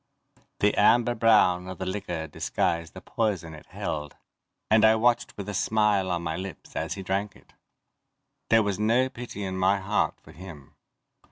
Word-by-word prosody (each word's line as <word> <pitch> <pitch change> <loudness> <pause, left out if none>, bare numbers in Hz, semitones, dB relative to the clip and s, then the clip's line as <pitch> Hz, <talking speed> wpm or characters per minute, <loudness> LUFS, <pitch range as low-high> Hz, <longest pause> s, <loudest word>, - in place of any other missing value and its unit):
The 105 0 +4
amber 120 +3 +4
brown 105 -6 +3
of 95 - -7
the 95 - -4
liquor 90 -4 -4
disguised 85 +2 -2
the - - -9
poison 95 -8 -2
it 75 - -13
held, 75 -2 -5 0.6
and 110 0 +5
I 110 0 +6
watched 120 +1 +1
with 100 -1 -6
a 105 - -4
smile 105 -2 +1
on 85 -1 -2
my 80 -1 -2
lips 95 0 -8
as - - -3
he 95 - -7
drank 100 +2 -2
it. - - -22 1.0
There 115 -1 +5
was 100 -1 -2
no 120 +5 +2
pity 120 -5 -7
in 95 -1 -4
my 95 +2 +3
heart 100 +2 -1
for - - -16
him. 80 -6 -12
100 Hz, 175 wpm, -26 LUFS, 90-110 Hz, 1.0 s, I